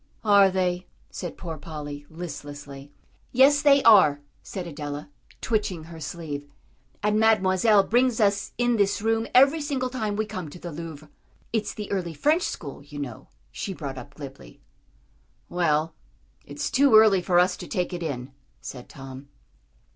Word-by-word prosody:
"Are 200 Hz, -2 st, +6 dB
they?" 180 Hz, -1 st, -1 dB, 0.2 s
said 175 Hz, -3 st, -6 dB
poor 165 Hz, -4 st, -6 dB
Polly, 145 Hz, -1 st, -7 dB
listlessly. 145 Hz, -4 st, -8 dB, 0.4 s
"Yes, 275 Hz, +3 st, +5 dB
they 285 Hz, -2 st, +5 dB
are," 190 Hz, -11 st, +7 dB, 0.2 s
said 185 Hz, -3 st, -6 dB
Adela, 145 Hz, -2 st, -6 dB, 0.3 s
twitching 205 Hz, -7 st, -1 dB
her 165 Hz, 0 st, -11 dB
sleeve, 150 Hz, -3 st, -6 dB, 0.6 s
"and 210 Hz, +1 st, +2 dB
Mademoiselle 210 Hz, -1 st, +4 dB
brings 245 Hz, +3 st, +2 dB
us 200 Hz, -1 st, +1 dB
in 240 Hz, -1 st, +2 dB
this 200 Hz, 0 st, +1 dB
room 225 Hz, 0 st, +1 dB
every 275 Hz, +5 st, +6 dB
single 265 Hz, -4 st, -2 dB
time 215 Hz, -5 st, -2 dB
we 215 Hz, +1 st, -1 dB
come 185 Hz, -7 st, -6 dB
to 160 Hz, -, -11 dB
the 175 Hz, 0 st, -7 dB
Louvre." 155 Hz, -1 st, -8 dB, 0.5 s
"It's 220 Hz, -2 st, -1 dB
the 210 Hz, -1 st, -6 dB
early 175 Hz, -5 st, -2 dB
French 305 Hz, -, +2 dB
school, 140 Hz, -, -5 dB
you 145 Hz, 0 st, -11 dB
know," 140 Hz, -3 st, -6 dB, 0.2 s
she 190 Hz, -, -5 dB
brought 135 Hz, -5 st, -6 dB
up 140 Hz, -1 st, -12 dB
glibly. 130 Hz, -, -11 dB, 0.9 s
"Well, 160 Hz, -2 st, +1 dB, 0.5 s
it's 145 Hz, -, -4 dB
too 270 Hz, -3 st, +5 dB
early 215 Hz, -4 st, +7 dB
for 175 Hz, 0 st, +1 dB
us 180 Hz, +1 st, +4 dB
to -, -, -8 dB
take 180 Hz, -3 st, -2 dB
it 175 Hz, -, -4 dB
in," 140 Hz, -5 st, -4 dB, 0.3 s
said 125 Hz, -2 st, -9 dB
Tom. 135 Hz, 0 st, -10 dB
180 Hz, 155 wpm, -25 LUFS, 145-215 Hz, 0.9 s, are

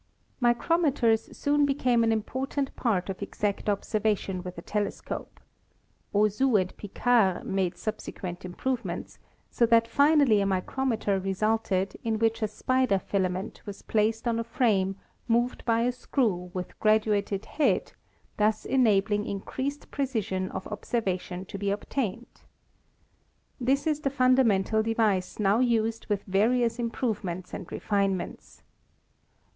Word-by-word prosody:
Micrometers 240 Hz, -2 st, +2 dB
soon 290 Hz, 0 st, +2 dB
became 255 Hz, -4 st, +2 dB
an 225 Hz, -, +3 dB
important 265 Hz, +5 st, -2 dB
part 200 Hz, -7 st, 0 dB
of 195 Hz, 0 st, -5 dB
exact 200 Hz, +1 st, -2 dB
observation 205 Hz, -2 st, 0 dB
with 180 Hz, -1 st, -8 dB
a 170 Hz, -, -7 dB
telescope. 210 Hz, -1 st, -4 dB, 0.7 s
Auzout 215 Hz, +3 st, +3 dB
and 185 Hz, 0 st, -3 dB
Picard 205 Hz, -2 st, +1 dB
made 190 Hz, -2 st, -1 dB
subsequent 195 Hz, -4 st, -5 dB
improvements, 190 Hz, 0 st, -4 dB, 0.3 s
so 235 Hz, -, +3 dB
that 230 Hz, 0 st, +4 dB
finally 280 Hz, -6 st, +4 dB
a -, -, +1 dB
micrometer 205 Hz, +1 st, 0 dB
resulted 195 Hz, 0 st, 0 dB
in 225 Hz, -1 st, 0 dB
which 225 Hz, +1 st, +1 dB
a 215 Hz, -, +2 dB
spider 255 Hz, -2 st, +1 dB
filament 185 Hz, 0 st, -2 dB
was 200 Hz, -, -8 dB
placed 225 Hz, +2 st, 0 dB
on 230 Hz, -1 st, +1 dB
a -, -, -1 dB
frame 220 Hz, -5 st, +1 dB, 0.3 s
moved 240 Hz, +1 st, +1 dB
by 230 Hz, -1 st, +2 dB
a 245 Hz, +1 st, +2 dB
screw 220 Hz, -8 st, -1 dB
with 180 Hz, -1 st, -6 dB
graduated 210 Hz, -2 st, +2 dB
head, 305 Hz, -, 0 dB, 0.4 s
thus 215 Hz, 0 st, +1 dB
enabling 210 Hz, -5 st, +2 dB
in 200 Hz, -, -3 dB
creased 280 Hz, +7 st, -5 dB
precision 215 Hz, -9 st, -2 dB
of 185 Hz, -, -6 dB
observation 190 Hz, -4 st, -3 dB
to 200 Hz, 0 st, -7 dB
be 200 Hz, 0 st, -1 dB
obtained. 230 Hz, +2 st, -3 dB, 1.2 s
This 270 Hz, +4 st, +1 dB
is 305 Hz, -2 st, +1 dB
the 285 Hz, -, 0 dB
fundamental 255 Hz, -6 st, +3 dB
device 220 Hz, -4 st, 0 dB
now 205 Hz, +1 st, +3 dB
used 230 Hz, -2 st, +1 dB
with 205 Hz, -2 st, -1 dB
various 230 Hz, +4 st, +2 dB
improve 230 Hz, -2 st, -1 dB
ments 180 Hz, 0 st, -5 dB
and -, -, -7 dB
refinements. 195 Hz, -3 st, -2 dB
220 Hz, 130 wpm, -27 LUFS, 195-245 Hz, 1.2 s, that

